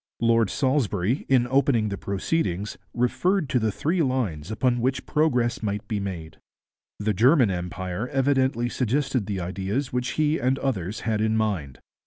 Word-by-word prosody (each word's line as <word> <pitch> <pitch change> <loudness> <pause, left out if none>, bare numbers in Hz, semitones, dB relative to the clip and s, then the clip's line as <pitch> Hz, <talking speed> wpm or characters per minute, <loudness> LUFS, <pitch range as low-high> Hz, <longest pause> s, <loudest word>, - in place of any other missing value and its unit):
Lord 115 -2 +3
Salisbury, 130 -5 0
in 130 -3 +4
opening 125 -4 +2
the 100 - -2
proceedings, 100 - -2 0.2
referred 165 +8 +1
to 125 - +2
the 110 -1 0
three 165 - 0
lines 115 - -1
upon 120 +2 +1
which 130 +1 -1
progress 125 -6 +1
might 105 -1 -3
be 105 -1 -2
made. 85 -5 -6 0.6
The 105 0 0
German 125 - +4
Empire 90 +4 -4
evidently 135 -3 +1
suggested 130 -1 -1
the 100 -2 -2
ideas 95 +9 -3
which 125 +1 -1
he 155 0 +1
and 130 +2 +1
others 110 -7 -2
had 110 -2 -1
in 110 0 +1
mind. 95 - -2
115 Hz, 155 wpm, -25 LUFS, 100-130 Hz, 0.6 s, in